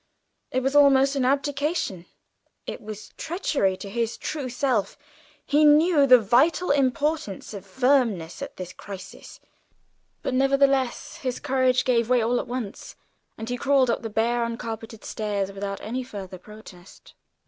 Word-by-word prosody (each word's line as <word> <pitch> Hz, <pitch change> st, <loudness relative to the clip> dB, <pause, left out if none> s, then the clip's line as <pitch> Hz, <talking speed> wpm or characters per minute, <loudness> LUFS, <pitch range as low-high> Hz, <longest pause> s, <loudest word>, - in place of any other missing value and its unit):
It 255 Hz, 0 st, -1 dB
was 270 Hz, +2 st, 0 dB
almost 275 Hz, -1 st, +5 dB
an 265 Hz, -2 st, +1 dB
abdication, 280 Hz, -, -1 dB, 0.6 s
it -, -, -6 dB
was 215 Hz, 0 st, -9 dB
treachery 295 Hz, -, -1 dB
to 200 Hz, -, -8 dB
his 230 Hz, +3 st, -2 dB
true 290 Hz, -5 st, -4 dB
self; 245 Hz, -4 st, -1 dB, 0.5 s
he 295 Hz, +2 st, +3 dB
knew 300 Hz, 0 st, +5 dB
the 255 Hz, -1 st, +9 dB
vital 265 Hz, -, +2 dB
importance 280 Hz, -, -1 dB
of 200 Hz, -1 st, -9 dB
firmness 235 Hz, -5 st, +1 dB
at 280 Hz, -, -7 dB
this 180 Hz, -1 st, -7 dB
crisis. 195 Hz, -2 st, -10 dB, 0.8 s
But -, -, -2 dB
nevertheless 270 Hz, -1 st, +1 dB
his 255 Hz, -2 st, -3 dB
courage 255 Hz, -1 st, +1 dB
gave 235 Hz, -2 st, +2 dB
way 250 Hz, -1 st, +4 dB
all 235 Hz, +2 st, +1 dB
at -, -, -5 dB
once, 240 Hz, -5 st, -6 dB, 0.4 s
and 225 Hz, -, -6 dB
he 245 Hz, +1 st, -2 dB
crawled 265 Hz, -1 st, +3 dB
up -, -, -2 dB
the 225 Hz, -, -5 dB
bare, 235 Hz, +3 st, 0 dB
uncarpeted 225 Hz, -1 st, -6 dB
stairs 205 Hz, -2 st, -2 dB
without 200 Hz, 0 st, -5 dB
any 245 Hz, +4 st, -3 dB
further 195 Hz, -7 st, -8 dB
protest! 195 Hz, -3 st, -15 dB
245 Hz, 150 wpm, -25 LUFS, 210-275 Hz, 0.8 s, the